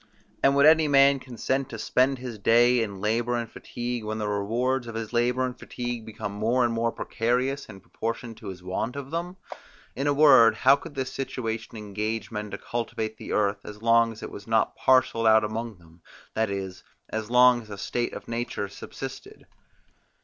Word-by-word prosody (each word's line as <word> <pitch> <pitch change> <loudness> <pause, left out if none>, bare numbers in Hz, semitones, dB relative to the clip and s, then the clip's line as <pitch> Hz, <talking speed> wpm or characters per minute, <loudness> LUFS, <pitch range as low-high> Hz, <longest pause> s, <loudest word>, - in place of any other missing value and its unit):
And 140 0 +4
would 140 +1 +5
any 160 0 +6
man 140 -1 +5
consent 130 +1 -2
to 115 - -6
spend 130 +5 +1
his 125 -4 -7
day 120 +3 +4
in 100 -4 -4
labour 115 +3 0
and 120 -1 -2
fatigue, 120 +1 -5
when 110 0 -3
the 105 -1 -2
rewards 120 +5 -1
of 115 - -7
his 115 0 -5
labour 125 +2 +2
and 125 -1 -4
fatigue 120 -2 -5
became 105 -2 -5
more 115 +5 +1
and 115 - 0
more 115 0 0
precarious 125 +6 -1
in 95 -3 -12
proportion 115 +3 -5
to - - -12
his 90 -2 -8
want 95 +7 -3
of 140 0 -7
them? 175 +3 -4 0.6
In 135 +4 -2
a 145 - +3
word, 130 -7 +7
how 135 +4 +5
could 150 +1 -11
this 130 -1 -3
situation 115 -4 -4
engage 105 +1 -4
men 105 -1 -4
to - - -5
cultivate 110 -2 -4
the - - -8
earth, 100 -1 +1
as 105 +1 -10
long 115 0 +4
as 110 - -11
it - - -6
was 100 - -10
not 110 -1 +1
parcelled 130 -3 +3
out 110 0 +6
among 110 +1 -4
them, 85 0 -21 0.3
that 110 -1 0
is, 95 -2 -5 0.3
as 110 0 -4
long 125 0 +6
as 110 - -15
a 100 - -7
state 120 +4 -2
of - - -8
nature 115 -3 -3
subsisted. 100 - -9
115 Hz, 195 wpm, -26 LUFS, 110-125 Hz, 0.6 s, word